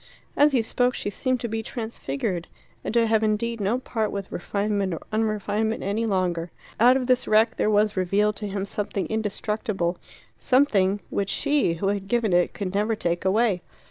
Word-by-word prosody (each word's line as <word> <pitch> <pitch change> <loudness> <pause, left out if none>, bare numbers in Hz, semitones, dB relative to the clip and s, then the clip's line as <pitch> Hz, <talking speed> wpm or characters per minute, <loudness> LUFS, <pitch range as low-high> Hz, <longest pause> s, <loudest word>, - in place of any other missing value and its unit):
As 295 +1 +5
he 250 -4 +2
spoke 245 +2 +1
she 205 - -3
seemed 255 +4 0
to 235 - -2
be 225 0 -2
transfigured, 190 - -4 0.4
and - - -3
to 235 -1 +5
have 220 -1 +2
indeed 220 +1 0
no 205 +5 +1
part 225 -4 -2
with 200 -1 -5
refinement 200 -1 -1
or - - -8
unrefinement 215 0 0
any 215 +4 -1
longer. 180 -4 0 0.3
Out 250 +3 +6
of 260 - -2
this 255 0 +2
wreck 215 +2 +3
there - - +2
was 210 0 +3
revealed 200 +3 +1
to 210 - -4
him 195 0 -3
something 200 -1 -3
indestructible 210 -4 -2 0.4
something 205 -7 +3
which 195 -1 -1
she, 275 - +1
who 195 +4 -1
had 200 -1 -2
given 225 -3 +1
it, 175 0 +2
could 195 -2 -4
never 210 +3 +1
take 175 -4 -1
away. 200 -1 +2
210 Hz, 180 wpm, -25 LUFS, 195-225 Hz, 0.4 s, Out